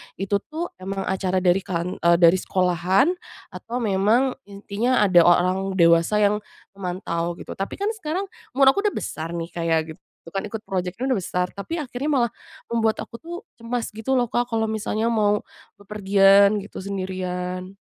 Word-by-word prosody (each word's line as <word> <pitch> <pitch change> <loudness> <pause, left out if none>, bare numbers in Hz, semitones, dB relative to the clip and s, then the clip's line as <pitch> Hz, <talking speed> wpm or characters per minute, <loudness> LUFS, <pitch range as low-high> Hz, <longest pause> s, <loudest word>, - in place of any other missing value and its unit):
itu 195 +2 -1
tuh 325 +3 -4
emang 195 +1 -4
acara 185 -1 -1
dari 180 +1 +4
kan 180 -2 -4
eee, 170 0 +4
dari 170 +1 +5
sekolahan 185 - +2 0.4
atau 230 - -7
memang 215 +6 +2 0.2
intinya 205 +4 0
ada 185 -4 +6
o 170 - +5
orang 180 +2 +4 0.2
dewasa 170 +2 +4
yang 205 +1 +3 0.3
memantau 180 -3 -3
gitu. - - -10
Tapi 195 - -4
kan 405 +2 -1
sekarang 370 -3 -3 0.3
umur 270 0 +7
aku 400 - -2
udah 410 - -2
besar 165 +2 -4
nih 170 0 -5
Kak 170 0 -4
ya, 160 -1 +2
gitu 160 0 -11 0.2
itu - - -12
kan 195 +4 -3
ikut 210 +1 -6
project-nya 190 +6 -3
udah 255 - +2
besar, 180 -1 -1
tapi 315 +12 -5
akhirnya 255 -1 -5
malah 260 -6 +2 0.4
membuat 225 -2 +1
aku 235 - -8
tuh 340 +6 -8 0.2
cemas 235 0 -3
gitu 220 +5 -3
loh 245 -3 +2
Kak, 240 +1 +1
kalau 220 -1 +1
misalnya 220 +1 -1
mau 210 -2 +2 0.4
bepergian 200 0 +4
gitu, 200 - -11
sendirian. 185 -1 -4
200 Hz, 175 wpm, -23 LUFS, 180-230 Hz, 0.4 s, umur